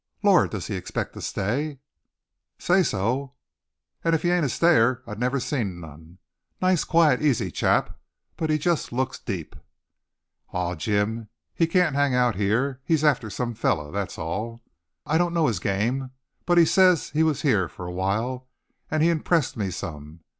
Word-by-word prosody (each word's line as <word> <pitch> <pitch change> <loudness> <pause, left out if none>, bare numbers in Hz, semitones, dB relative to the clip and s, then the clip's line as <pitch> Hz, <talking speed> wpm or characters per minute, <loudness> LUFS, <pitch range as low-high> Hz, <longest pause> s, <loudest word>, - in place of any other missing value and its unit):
"Lord! 200 -4 +5
does 100 -5 -5
he - - -4
expect 95 -2 -4
to - - -9
stay?" 135 +9 -2 0.8
"Say 185 +2 +3
so. 130 - -1 0.7
An' 165 0 +3
if 160 - -2
he 175 - +2
ain't 175 -2 +2
a - - 0
stayer 130 -5 +3
I 110 - -7
never 125 +5 -1
seen 110 - -2
none. 80 +2 -13 0.4
Nice, 185 -2 +2
quiet, 160 -6 +3
easy 145 -6 +1
chap, - - 0 0.4
but 160 - -2
he 155 - +3
just 165 +1 -1
looks 130 +2 -2
deep." 90 -6 -6 1.0
"Aw, 90 -1 -1
Jim, 105 +5 -1 0.2
he 165 - +2
can't 175 -3 +2
hang 140 -2 +2
out 125 -2 +3
heah. 115 +8 0
He's 160 -1 +1
after 135 -7 +2
some 120 +3 -3
feller, 80 -9 -1
that's 100 -1 -4
all." 110 +8 -4 0.4
"I 160 - +1
don't 175 -1 0
know 165 -2 +3
his 110 - 0
game. 115 +8 -1 0.4
But 175 -1 +3
he 170 - +7
says 180 -1 +4
he 155 - +1
was 155 -3 +1
heah 105 - +2
for 90 - -9
a 90 - -5
while. 110 +8 -2 0.4
An' 155 0 0
he 165 - +4
impressed 165 -2 +1
me 100 -4 -2
some. 80 -2 -7
125 Hz, 175 wpm, -25 LUFS, 100-155 Hz, 1.0 s, he